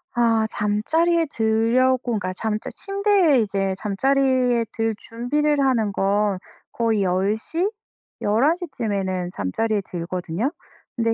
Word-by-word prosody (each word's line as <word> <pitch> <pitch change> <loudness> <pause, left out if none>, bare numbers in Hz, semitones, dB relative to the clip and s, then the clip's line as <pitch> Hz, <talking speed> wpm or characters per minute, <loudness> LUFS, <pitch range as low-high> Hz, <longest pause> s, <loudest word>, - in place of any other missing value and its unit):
아 225 -2 +3
잠자리에 320 +12 +1
들려고 230 +4 +2 0.2
그러니까 185 -1 -3
잠자 215 +2 -3
침대에 395 - +2
이제 195 -2 -1
잠자리에 250 +2 +2
들 225 -1 -1
준비를 290 +6 0
하는 235 -6 +2
건 200 0 +1 0.3
거의 225 -4 +1
10:00, 210 - 0 0.5
11:00 290 - +2
쯤에는 190 -4 -2
잠자리에 205 - -1
들거든요. 180 - -3 0.4
근데 230 -1 +1
225 Hz, 245 characters per minute, -23 LUFS, 200-265 Hz, 0.5 s, 아